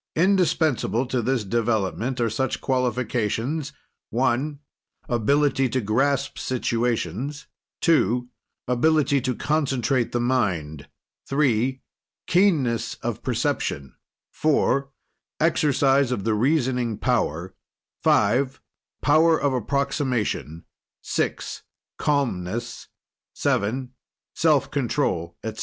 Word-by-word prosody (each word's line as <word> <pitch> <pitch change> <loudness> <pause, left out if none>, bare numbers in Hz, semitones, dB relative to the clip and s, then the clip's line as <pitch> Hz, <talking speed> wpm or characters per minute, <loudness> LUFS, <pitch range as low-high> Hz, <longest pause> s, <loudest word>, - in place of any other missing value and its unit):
Indispensable 160 - +2
to 125 -1 -1
this 125 0 0
development 115 +3 -1
are 120 - +2
such 130 +4 -1
qualifications 125 +2 -1 0.4
(1) 130 +4 0 0.5
Ability 135 +3 +2
to 130 - 0
grasp 135 +5 0
situations; 120 - -2 0.4
(2) 125 - +2 0.4
Ability 140 +2 +2
to 130 -1 -1
concentrate 135 -5 0
the 120 - 0
mind; 90 - -1 0.4
(3) 130 -2 +1 0.4
Keenness 160 - +2
of - - -3
perception; 70 -1 -2 0.4
(4) 140 -2 +1 0.5
Exercise 140 -4 +3
of 105 -6 -2
the 110 - +1
reasoning 125 -2 +1
power; 85 +5 -1 0.5
(5) 125 +6 +2 0.4
Power 160 +2 +4
of 140 -2 +1
approximation; 125 - -1 0.4
(6) - - -2 0.4
Calmness; 120 -8 -1 0.5
(7) 125 +5 0 0.4
Self 155 -4 +2
control, 120 - -1
etc. 110 0 -5
130 Hz, 90 wpm, -24 LUFS, 115-140 Hz, 0.5 s, Power